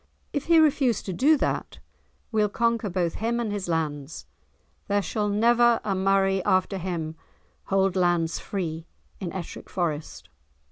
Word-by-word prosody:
"If 285 - -2
he 335 -1 +5
refuse 285 -7 +3
to 190 - -4
do 295 - +4
that, - - -2 0.5
we'll 215 -2 +2
conquer 230 0 0
both 175 -2 -1
him 235 +1 0
and 225 -3 -2
his 205 -3 -3
lands; 150 -2 -3 0.6
there 205 0 +2
shall 210 0 -1
never 235 +3 +4
a 200 - -1
Murray 195 0 +2
after 185 +1 +1
him 165 -3 -4 0.5
hold 195 -1 +1
lands 175 -3 +1
free 165 -4 -4 0.3
in 180 -4 -4
Ettrick 185 -3 -7
Forest." 160 -4 -3
195 Hz, 145 wpm, -26 LUFS, 175-230 Hz, 0.6 s, he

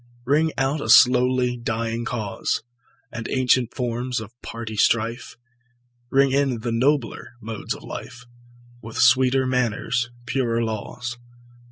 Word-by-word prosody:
Ring 155 +4 +2
out 135 +2 0
a 110 - -4
slowly 125 +1 +5
dying 115 0 -2
cause, 110 -4 -2 0.5
And 115 -1 -6
ancient 130 -2 +2
forms 125 0 -2
of 110 -1 -9
party 115 -1 -6
strife; 115 +3 0 0.7
Ring 135 0 +3
in 135 -4 +1
the 120 +1 -2
nobler 120 -1 0
modes 110 -2 -5
of - - -13
life, 125 +1 -8 0.6
With 115 0 -8
sweeter 130 +2 +4
manners, 120 -1 0 0.2
purer 120 -3 0
laws. 120 +2 -5
120 Hz, 125 wpm, -23 LUFS, 115-130 Hz, 0.7 s, slowly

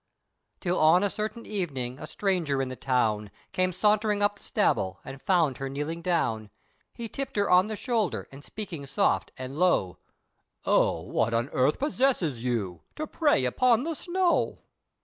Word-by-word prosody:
Till 180 -1 0
on 165 +5 +5
a 200 - +1
certain 215 +2 -4
evening, 140 -11 -3
a - - -7
stranger 175 -9 0
in 135 -1 -1
the 130 - -5
town, 110 -6 0 0.2
Came 185 0 +1
sauntering 210 +2 +2
up 205 0 +2
the - - -17
Staball, 95 - +1
and 135 0 -8
found 170 -8 +2
her 135 0 -3
kneeling 150 +5 -4
down, 115 - 0 0.5
He 235 - -5
tipped 270 +5 -5
her 200 -1 +1
on 180 +2 +6
the 215 - -3
shoulder, 225 -4 -1
and 135 +1 -12
speaking 170 -10 -7
soft, 140 - +1
and 130 +3 -6
low, 95 - +2 0.7
"O - - +3
what 115 +1 0
on 120 +4 0
earth 130 +4 +2
possesses 250 - 0
you, 105 -9 -2
to 310 - -3
pray 295 - +2
upon 240 - +3
the 330 +2 -2
snow." 350 +2 0
175 Hz, 170 wpm, -27 LUFS, 130-210 Hz, 0.7 s, on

